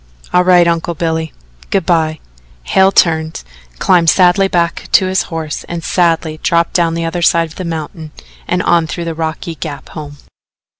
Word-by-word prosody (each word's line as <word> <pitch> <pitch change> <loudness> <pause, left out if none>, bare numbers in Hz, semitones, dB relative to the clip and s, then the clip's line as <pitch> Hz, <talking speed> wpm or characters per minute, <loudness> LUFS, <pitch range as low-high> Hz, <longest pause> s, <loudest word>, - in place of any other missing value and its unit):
"All 180 - +4
right, 180 -1 +5
Uncle 170 0 -1
Billy. 160 -1 -2 0.4
Good 190 -4 0
by." 160 -3 +1 0.4
Hale 190 - +3
turned, 160 -3 +1 0.3
climbed 170 - +3
sadly 185 +3 +4
back 170 -3 -1
to 190 - +5
his 190 +1 +1
horse 160 -3 -4
and 170 -1 -6
sadly 165 -3 0
dropped 170 0 +1
down 170 -2 +1
the 165 0 -2
other 165 +1 -3
side 170 -1 +3
of 160 - -15
the 185 - -4
mountain 160 0 -5 0.4
and 180 0 0
on 170 -2 +2
through 170 +2 -5
the 165 - -3
rocky 160 +1 -4
gap 155 -3 -7
home. 145 -2 -9
165 Hz, 170 wpm, -15 LUFS, 160-175 Hz, 0.4 s, right